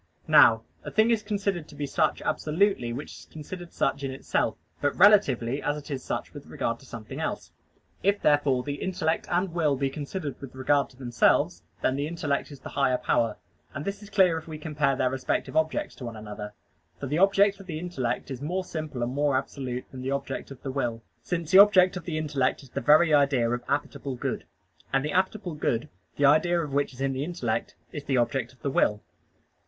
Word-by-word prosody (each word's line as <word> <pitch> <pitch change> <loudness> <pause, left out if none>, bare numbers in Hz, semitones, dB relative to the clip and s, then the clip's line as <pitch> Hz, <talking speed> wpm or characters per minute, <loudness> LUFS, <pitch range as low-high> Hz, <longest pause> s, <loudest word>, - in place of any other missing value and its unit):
Now - - +7 0.2
a - - -5
thing 220 +2 +3
is 225 -2 +2
considered 200 -6 -2
to - - -13
be 145 - -3
such 140 - 0
absolutely 160 -6 +1
which 80 -10 -6
is 80 - -14
considered 175 +3 -8
such 140 - 0
in 135 - -1
itself: 130 +1 -1 0.2
but 145 - +1
relatively 145 - +5
as 145 0 -1
it 150 0 -9
is 130 -2 -3
such - - -4
with 145 -2 -10
regard 115 -5 -2
to 135 - -17
something 115 -3 -8
else. - - -3 0.5
If 200 +1 +2
therefore 145 -4 +3
the 145 +1 -5
intellect 165 -4 -1
and 175 0 0
will 155 -5 +2
be 135 0 -1
considered 145 +1 -5
with 135 -2 -9
regard 140 +2 +2
to 125 - -20
themselves, 120 -3 +2 0.2
then 130 - +2
the 145 +1 -1
intellect 155 -4 -2
is 140 -2 -11
the - - -9
higher 135 -3 +2
power. 115 -4 +1 0.4
And 140 - -4
this 200 +1 -4
is 205 - -11
clear 180 -6 +4
if 160 - -16
we 155 -1 -6
compare 150 -3 0
their 130 0 +1
respective 135 +3 -2
objects 160 0 0
to 125 - -7
one 115 -1 -6
another. 105 -1 -7 0.5
For - - -4
the 150 +4 -1
object 200 +1 +4
of 195 - -12
the 160 -4 -4
intellect 145 -7 -3
is 130 -1 -5
more 180 +6 -2
simple 155 -8 -4
and 120 +2 -2
more 145 -1 +2
absolute 130 -2 -4
than 130 - -8
the 130 - -3
object 140 -1 -3
of 135 -3 -12
the 135 - -3
will; 120 -4 -2 0.2
since 170 +4 -3
the 190 - +8
object 190 -3 +7
of 180 -3 -6
the 160 -3 -3
intellect 145 -4 0
is 130 - -16
the - - -3
very 155 +2 +5
idea 140 -5 +4
of 120 0 -2
appetible 140 -2 -2
good; - - -3 0.5
and 135 +1 +1
the 150 - -2
appetible 190 -1 0
good, 120 +1 0 0.3
the 145 - +2
idea 170 +5 +4
of 150 -4 -4
which 140 0 +1
is 130 0 -11
in 135 0 0
the 130 +1 -2
intellect, 145 -9 -2 0.2
is 145 -2 -7
the 135 -2 +1
object 120 0 0
of 130 - -25
the 140 - 0
will. 105 -5 +2
145 Hz, 215 wpm, -27 LUFS, 130-170 Hz, 0.5 s, the